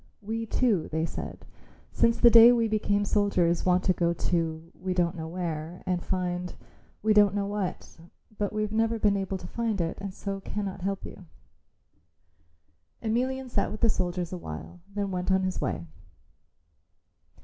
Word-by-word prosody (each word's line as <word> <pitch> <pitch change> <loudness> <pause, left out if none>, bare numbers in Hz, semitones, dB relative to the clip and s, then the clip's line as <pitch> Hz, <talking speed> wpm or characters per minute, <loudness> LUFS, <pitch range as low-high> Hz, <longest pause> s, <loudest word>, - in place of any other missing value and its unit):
"We 225 +2 -3
too," 215 -8 +1
they 160 +1 0
said, - - -7 0.5
"since 230 0 +3
the 235 - +7
day 230 +1 +10
we 230 -2 +3
became 205 -1 +1
soldiers 185 -5 +2
want 180 +1 +3
to 185 - +3
go 170 -1 +1
to 165 -1 -2
we 185 0 -4
don't 175 0 +1
know 160 -1 -5
where 165 -1 -4
and 180 -1 0
find 180 -1 -2 0.5
we 215 0 +4
don't 205 -1 +5
know 200 -1 0
what, 200 -4 -4 0.4
but 205 -1 -1
we've 215 0 -2
never 225 +1 +1
been 210 -2 +3
able 195 -1 -2
to 180 - -11
find 225 +1 -2
it 165 -1 -2
and 200 -1 -4
so 195 +1 -5
cannot 195 -1 -4
help 195 +1 -2
you." 185 - -11 1.8
Emelian 255 +4 -1
sat 245 - 0
with 215 - -7
the 230 - +5
soldiers 180 -2 -2
awhile 170 - -7
then 200 -1 -2
went 180 +1 -1
on 190 0 +3
his 185 0 -2
way. 85 -3 -2
195 Hz, 165 wpm, -28 LUFS, 175-215 Hz, 1.8 s, day